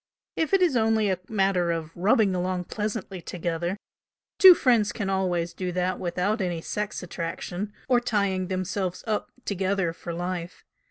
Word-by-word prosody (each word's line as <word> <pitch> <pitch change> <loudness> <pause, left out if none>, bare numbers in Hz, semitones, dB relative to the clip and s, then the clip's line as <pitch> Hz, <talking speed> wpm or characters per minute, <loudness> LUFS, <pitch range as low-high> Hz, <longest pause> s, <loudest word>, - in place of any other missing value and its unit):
If 320 - 0
it 390 -1 +4
is 330 -7 +3
only 220 -3 +3
a 185 - -1
matter 195 -4 +2
of 165 -1 -4
'rubbing 195 +2 +3
along 180 0 -1
pleasantly 205 -2 -4
together' 175 +2 -3 0.6
two 375 -2 +11
friends 235 -8 +3
can 200 -4 -3
always 175 -3 0
do 180 -1 -3
that 185 +1 -1
without 185 +4 -1
any 175 -3 -1
'sex' 210 +4 -4
attraction, 175 +3 -4 0.2
or 250 -2 +4
tying 200 -6 0
themselves 185 0 -2
up 215 -2 -1 0.2
together 190 -3 0
for 170 - -7
life. 175 0 -5
185 Hz, 155 wpm, -26 LUFS, 175-210 Hz, 0.6 s, two